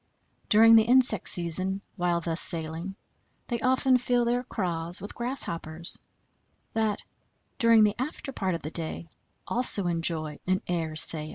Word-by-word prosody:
During 225 +2 +6
the 225 - +7
insect 245 -2 +4
season, 185 +3 +2
while 175 -2 -1
thus 165 0 -1
sailing, 165 +3 -1 0.5
they 240 -2 -2
often 255 +1 +2
fill 245 -1 0
their 240 +1 0
craws 175 -7 -1
with 205 +2 -8
grass 250 +3 -3
hoppers, 165 0 -1 0.7
that, 220 -2 -1 0.6
during 230 -1 +5
the 210 -1 +2
after 275 0 -6
part 190 -8 -2
of 165 - -8
the 155 - -6
day, 165 0 -2 0.4
also 235 -5 0
enjoy 165 -3 -2
an 185 +3 0
air 165 -3 -3
sail. 155 0 +1
190 Hz, 150 wpm, -26 LUFS, 165-230 Hz, 0.7 s, the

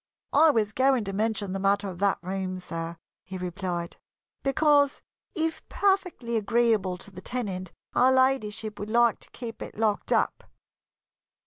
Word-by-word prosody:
"I 315 +3 +7
was 215 -6 +1
going 260 -1 +3
to 195 -1 -4
mention 210 -1 0
the 195 - -2
matter 200 +1 +2
of 180 -2 -7
that 200 0 +2
room, 185 0 -3
sir," 165 -1 -5 0.3
he 190 - -7
replied, 180 -1 -4 0.4
"because, 285 0 +3 0.3
if 325 -1 -1
perfectly 360 - +1
agreeable 215 -4 +2
to 200 - -12
the 185 -1 -10
tenant, 190 -5 -4 0.2
Her 255 - +5
Ladyship 225 -5 +1
would 205 +1 -5
like 235 0 +3
to - - -10
keep 230 -2 -8
it - - -8
locked 215 -2 0
up." - - +1
210 Hz, 150 wpm, -27 LUFS, 190-255 Hz, 0.4 s, I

